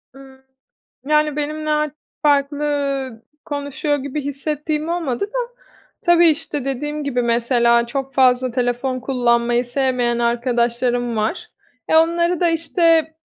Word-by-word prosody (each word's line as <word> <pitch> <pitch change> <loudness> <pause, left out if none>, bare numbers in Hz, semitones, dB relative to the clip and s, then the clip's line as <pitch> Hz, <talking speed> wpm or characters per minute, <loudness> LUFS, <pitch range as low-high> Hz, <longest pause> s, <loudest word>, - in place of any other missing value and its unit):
Imm, 265 -1 -15 0.6
yani, 300 0 +2
benimle 305 +1 -3
a 300 0 0 0.3
farklı 285 -2 0 0.4
konuşuyor 290 0 -2
gibi 280 +2 -4
hissettiğim 300 +2 -3
olmadı 335 -4 -1
da... - - -4 0.5
Tabii, 345 0 +6
işte, 300 -3 -2
dediğim 295 +3 -3
gibi, 250 -3 -1
mesela 235 0 +2
çok 270 +2 -4
fazla 255 -1 +3
telefon 250 +1 -1
kullanmayı 240 -1 +1
sevmeyen 245 -2 0
arkadaşlarım 240 0 0
var. 215 +1 -2 0.4
E, - - +3
onları 340 +1 +3
da, 345 -1 +3
işte, 330 -1 +2
275 Hz, 120 wpm, -20 LUFS, 245-305 Hz, 0.6 s, Tabii